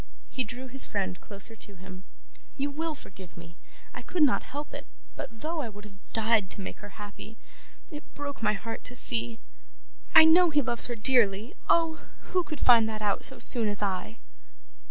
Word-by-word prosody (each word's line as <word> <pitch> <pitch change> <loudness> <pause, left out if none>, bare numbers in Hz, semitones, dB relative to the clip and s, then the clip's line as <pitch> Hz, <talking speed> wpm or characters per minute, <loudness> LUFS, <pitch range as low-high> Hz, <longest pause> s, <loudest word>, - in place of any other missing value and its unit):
He 260 - -1
drew 250 +4 -8
his 260 +1 +1
friend 190 -3 -3
closer 205 +2 -1
to 205 -2 -8
him. 185 +1 -12 0.5
'You 285 +1 -1
will 315 +2 -3
forgive 185 -9 -13
me; 170 0 -12 0.4
I - - -7
could 350 -4 0
not 285 - +3
help 290 +2 -7
it, - - -8 0.3
but 225 -1 -8
though 320 +1 -2
I 240 - -4
would 205 0 -12
have 200 -1 -17
died 220 -3 +2
to - - +1
make - - -7
her 205 -1 -12
happy, 210 +1 -10 0.5
it 300 0 -11
broke 285 -2 -6
my 210 -1 +2
heart 225 +3 -6
to 250 - -2
see 235 -2 +1 0.8
I 320 0 +10
know 345 +2 +6
he 295 -2 +2
loves 235 -2 +1
her 240 - -4
dearly 225 -2 +3 0.2
Oh! 330 -1 +2 0.3
who 365 - +3
could 310 -4 -7
find 230 -3 +5
that 215 -1 -5
out 205 -1 0
so 265 - +3
soon 235 -1 +2
as 205 0 0
I? 195 +3 -3
230 Hz, 195 wpm, -28 LUFS, 205-285 Hz, 0.8 s, I